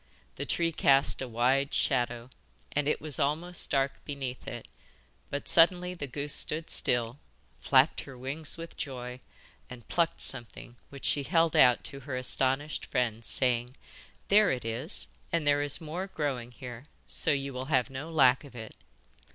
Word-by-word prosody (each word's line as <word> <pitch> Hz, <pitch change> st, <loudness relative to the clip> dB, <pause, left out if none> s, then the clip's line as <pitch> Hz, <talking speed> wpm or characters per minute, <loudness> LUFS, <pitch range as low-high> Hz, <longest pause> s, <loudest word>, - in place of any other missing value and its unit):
The -, -, -6 dB
tree 170 Hz, -1 st, 0 dB
cast 140 Hz, -4 st, +3 dB
a 130 Hz, -, -3 dB
wide 130 Hz, +4 st, +1 dB
shadow, 120 Hz, 0 st, 0 dB, 0.4 s
and 145 Hz, -1 st, -1 dB
it 150 Hz, -, 0 dB
was 150 Hz, -2 st, -2 dB
almost 165 Hz, +5 st, 0 dB
dark 135 Hz, -1 st, -1 dB
beneath 135 Hz, -3 st, -6 dB
it, -, -, -7 dB, 0.6 s
but 145 Hz, -, -5 dB
suddenly 180 Hz, +2 st, +4 dB
the 145 Hz, -6 st, -6 dB
goose 140 Hz, +3 st, -3 dB
stood 155 Hz, +2 st, +1 dB
still, 120 Hz, +2 st, +1 dB, 0.4 s
flapped -, -, +3 dB
her 135 Hz, -2 st, -11 dB
wings 140 Hz, +6 st, +1 dB
with 165 Hz, 0 st, -9 dB
joy, 125 Hz, -2 st, -6 dB, 0.5 s
and 120 Hz, -2 st, -11 dB
plucked 170 Hz, -1 st, 0 dB
something, 120 Hz, +1 st, -2 dB
which 140 Hz, -1 st, -10 dB
she 145 Hz, -, +2 dB
held 165 Hz, +2 st, +1 dB
out 125 Hz, -2 st, +5 dB
to 140 Hz, -, -5 dB
her 130 Hz, -1 st, -5 dB
astonished 135 Hz, +3 st, -1 dB
friend, 115 Hz, -2 st, -1 dB
saying: 125 Hz, +1 st, +2 dB, 0.5 s
'There 205 Hz, -1 st, +5 dB
it 125 Hz, -3 st, -3 dB
is, 120 Hz, -, 0 dB, 0.2 s
and 165 Hz, -3 st, 0 dB
there 145 Hz, 0 st, +3 dB
is 145 Hz, -1 st, +1 dB
more 170 Hz, +4 st, -5 dB
growing 140 Hz, -9 st, -3 dB
here, 120 Hz, +1 st, -10 dB, 0.2 s
so -, -, +2 dB
you 140 Hz, -1 st, -1 dB
will 130 Hz, +1 st, -5 dB
have 135 Hz, -2 st, +1 dB
no 140 Hz, +5 st, -6 dB
lack 135 Hz, -5 st, +4 dB
of 140 Hz, -3 st, -14 dB
it. 110 Hz, -2 st, -9 dB
140 Hz, 165 wpm, -29 LUFS, 125-155 Hz, 0.6 s, out